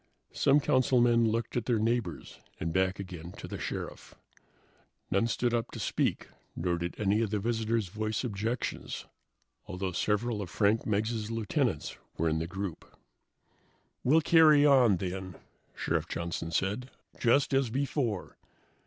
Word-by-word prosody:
Some 140 Hz, +2 st, +4 dB
councilmen 120 Hz, -4 st, +3 dB
looked 115 Hz, +1 st, -2 dB
at 120 Hz, -3 st, -1 dB
their 120 Hz, -3 st, +2 dB
neighbors 115 Hz, +2 st, -2 dB, 0.2 s
and 80 Hz, 0 st, -2 dB
back 95 Hz, +1 st, +1 dB
again 90 Hz, -3 st, -7 dB
to -, -, -8 dB
the -, -, -6 dB
Sheriff. -, -, -6 dB, 1.0 s
None 100 Hz, +5 st, +2 dB
stood 120 Hz, +1 st, 0 dB
up 115 Hz, 0 st, 0 dB
to -, -, -6 dB
speak, -, -, -1 dB, 0.3 s
nor 85 Hz, 0 st, -1 dB
did 85 Hz, 0 st, -4 dB
any 105 Hz, +1 st, +2 dB
of 110 Hz, -, 0 dB
the 105 Hz, -, 0 dB
visitors 110 Hz, -1 st, 0 dB
voice 110 Hz, +4 st, -2 dB
objections, 115 Hz, +1 st, -3 dB, 0.6 s
although 95 Hz, 0 st, -3 dB
several 105 Hz, +4 st, 0 dB
of 95 Hz, -, -5 dB
Frank 105 Hz, +4 st, +1 dB
Meggs' 110 Hz, +1 st, -1 dB
lieutenants 115 Hz, -3 st, -1 dB, 0.2 s
were 80 Hz, -, +1 dB
in 80 Hz, 0 st, 0 dB
the 80 Hz, -, -3 dB
group. 95 Hz, -2 st, -6 dB, 1.1 s
"We'll 155 Hz, +6 st, +5 dB
carry 155 Hz, -3 st, +6 dB
on, 125 Hz, -9 st, +6 dB
then," 95 Hz, 0 st, -5 dB, 0.4 s
Sheriff -, -, -1 dB
Johnson 85 Hz, -1 st, -3 dB
said, 100 Hz, +9 st, -1 dB, 0.3 s
"just 135 Hz, +4 st, +3 dB
as 135 Hz, -3 st, +2 dB
before. 125 Hz, -, -2 dB
110 Hz, 145 wpm, -30 LUFS, 95-120 Hz, 1.1 s, carry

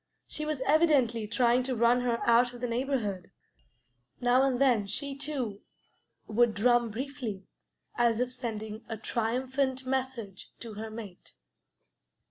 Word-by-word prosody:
She 305 Hz, 0 st, -5 dB
was 305 Hz, -4 st, -2 dB
evidently 270 Hz, -7 st, +3 dB
trying 240 Hz, +2 st, +3 dB
to 255 Hz, 0 st, -2 dB
run 235 Hz, +2 st, +4 dB
her 240 Hz, -2 st, -1 dB
out 240 Hz, +1 st, +4 dB
of -, -, -9 dB
the 245 Hz, -, -1 dB
neighborhood. 235 Hz, -6 st, -2 dB, 0.9 s
Now 245 Hz, +1 st, +4 dB
and 265 Hz, -2 st, +2 dB
then, 240 Hz, -7 st, +3 dB
she, 280 Hz, +6 st, -3 dB
too, 270 Hz, -8 st, -4 dB, 0.6 s
would 230 Hz, +1 st, +2 dB
drum 240 Hz, +2 st, +3 dB
briefly, 240 Hz, -4 st, -5 dB, 0.5 s
as 235 Hz, -2 st, +2 dB
if 250 Hz, 0 st, 0 dB
sending 220 Hz, -2 st, -5 dB
a 225 Hz, -, -3 dB
triumphant 260 Hz, +4 st, -1 dB
message 255 Hz, -7 st, -3 dB
to 230 Hz, -2 st, -7 dB
her 220 Hz, +1 st, -6 dB
mate. 215 Hz, -5 st, -10 dB
240 Hz, 135 wpm, -29 LUFS, 225-260 Hz, 0.9 s, run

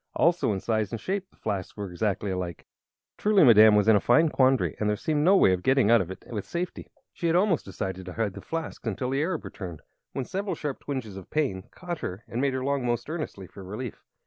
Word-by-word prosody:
Also 170 Hz, -8 st, +3 dB
in 100 Hz, -, -1 dB
size 110 Hz, -1 st, -1 dB
and 115 Hz, -, -3 dB
shape 195 Hz, -, -3 dB
the -, -, -28 dB
flasks 95 Hz, 0 st, -4 dB
were 100 Hz, -3 st, -5 dB
exactly 100 Hz, +1 st, -1 dB
alike. 90 Hz, -3 st, -4 dB, 0.5 s
Truly 210 Hz, -3 st, +4 dB
Madame 110 Hz, -4 st, +8 dB
was 105 Hz, 0 st, +3 dB
in 110 Hz, -, +7 dB
a -, -, +5 dB
fine 160 Hz, +9 st, +4 dB
quandary, 130 Hz, -2 st, +2 dB
and 105 Hz, -, +1 dB
there 105 Hz, -, +2 dB
seemed 150 Hz, +6 st, 0 dB
no 190 Hz, +4 st, +6 dB
way 95 Hz, -, +5 dB
of 90 Hz, -, -1 dB
getting 130 Hz, -1 st, +3 dB
out 115 Hz, -, +6 dB
of 90 Hz, -, -4 dB
it 95 Hz, -, -9 dB
with 105 Hz, -4 st, -3 dB
safety. 175 Hz, +1 st, -4 dB, 0.3 s
She 170 Hz, -, -2 dB
had 165 Hz, -, +2 dB
almost 180 Hz, -3 st, +2 dB
decided 95 Hz, -1 st, -5 dB
to 90 Hz, -, -6 dB
hide 110 Hz, -2 st, -1 dB
both -, -, -10 dB
flasks 165 Hz, -6 st, -5 dB
until 120 Hz, +5 st, -2 dB
the 135 Hz, +1 st, +1 dB
Arab 165 Hz, 0 st, -2 dB
returned, 90 Hz, -6 st, -8 dB, 0.3 s
when 135 Hz, -, -3 dB
several 195 Hz, +5 st, -3 dB
sharp 145 Hz, -3 st, -4 dB
twinges 125 Hz, -9 st, -5 dB
of 95 Hz, -, -10 dB
pain 130 Hz, -12 st, -1 dB
caught 175 Hz, -2 st, -6 dB
her 95 Hz, -3 st, -5 dB
and 120 Hz, -, -3 dB
made 140 Hz, -1 st, +1 dB
her 130 Hz, -, -2 dB
long 140 Hz, -1 st, 0 dB
most 120 Hz, -1 st, -1 dB
earnestly 155 Hz, -, -5 dB
for 95 Hz, +2 st, -12 dB
relief. 105 Hz, +5 st, -7 dB
120 Hz, 240 wpm, -27 LUFS, 100-155 Hz, 0.5 s, Madame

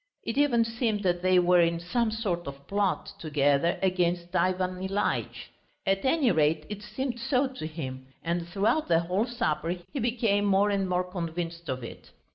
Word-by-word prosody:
It 230 Hz, -, -3 dB
even 260 Hz, -5 st, +3 dB
seemed 225 Hz, -2 st, -1 dB
that 175 Hz, -2 st, +1 dB
they 185 Hz, 0 st, +4 dB
were 180 Hz, 0 st, +5 dB
in 170 Hz, 0 st, +2 dB
some 220 Hz, +7 st, 0 dB
sort 195 Hz, -7 st, -2 dB
of 140 Hz, 0 st, -8 dB
plot 200 Hz, -1 st, -1 dB
together 145 Hz, +1 st, +2 dB
against 175 Hz, -1 st, 0 dB
Ivan 185 Hz, +1 st, +1 dB
Ilyitch. 195 Hz, +2 st, -2 dB, 0.3 s
At 195 Hz, 0 st, +1 dB
any 265 Hz, -3 st, +3 dB
rate 155 Hz, -1 st, +2 dB
it 210 Hz, -1 st, -6 dB
seemed 240 Hz, +4 st, -4 dB
so 260 Hz, +2 st, +1 dB
to 255 Hz, -11 st, -6 dB
him, 130 Hz, -5 st, -6 dB, 0.2 s
and 170 Hz, 0 st, -1 dB
throughout 205 Hz, -, +1 dB
the 165 Hz, -1 st, +4 dB
whole 185 Hz, +7 st, 0 dB
supper 170 Hz, -8 st, -1 dB, 0.2 s
he 285 Hz, -, -2 dB
became 225 Hz, -4 st, +1 dB
more 200 Hz, +1 st, +3 dB
and 195 Hz, -2 st, 0 dB
more 180 Hz, 0 st, +1 dB
convinced 170 Hz, -2 st, -5 dB
of 130 Hz, -1 st, -3 dB
it. 115 Hz, -, -10 dB
185 Hz, 175 wpm, -28 LUFS, 170-215 Hz, 0.3 s, were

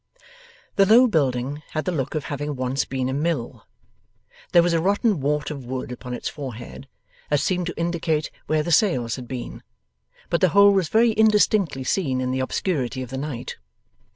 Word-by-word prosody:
The 195 Hz, -1 st, +5 dB
low 235 Hz, +5 st, +7 dB
building 140 Hz, -, 0 dB
had 155 Hz, -, -2 dB
the 185 Hz, -, 0 dB
look 135 Hz, -5 st, -3 dB
of 155 Hz, -, -1 dB
having 145 Hz, 0 st, -4 dB
once 130 Hz, +1 st, -1 dB
been 130 Hz, -1 st, -2 dB
a 130 Hz, -, -2 dB
mill. 145 Hz, -4 st, -2 dB, 0.8 s
There 170 Hz, -, +6 dB
was 175 Hz, 0 st, +1 dB
a 165 Hz, -, +2 dB
rotten 200 Hz, +1 st, +1 dB
wart 150 Hz, +2 st, -1 dB
of 140 Hz, -3 st, -6 dB
wood 130 Hz, 0 st, -5 dB
upon 125 Hz, 0 st, -6 dB
its -, -, -5 dB
forehead 130 Hz, -2 st, -7 dB, 0.4 s
that 145 Hz, -, +2 dB
seemed 180 Hz, +1 st, 0 dB
to 175 Hz, -, -5 dB
indicate 165 Hz, -2 st, -1 dB, 0.2 s
where 155 Hz, -1 st, +1 dB
the 170 Hz, -, -3 dB
sails 150 Hz, -, +2 dB
had 125 Hz, -2 st, -8 dB
been, 125 Hz, -1 st, -6 dB, 0.7 s
but 170 Hz, -, +1 dB
the 185 Hz, -, +5 dB
whole 200 Hz, +3 st, +6 dB
was 190 Hz, -5 st, +1 dB
very 230 Hz, +1 st, +4 dB
indistinctly 210 Hz, -9 st, +3 dB
seen 135 Hz, -4 st, 0 dB
in 130 Hz, 0 st, -1 dB
the 130 Hz, -, -1 dB
obscurity 130 Hz, -2 st, -2 dB
of 125 Hz, -, -10 dB
the 135 Hz, -, -4 dB
night. 135 Hz, -4 st, -5 dB
150 Hz, 185 wpm, -23 LUFS, 130-180 Hz, 0.8 s, low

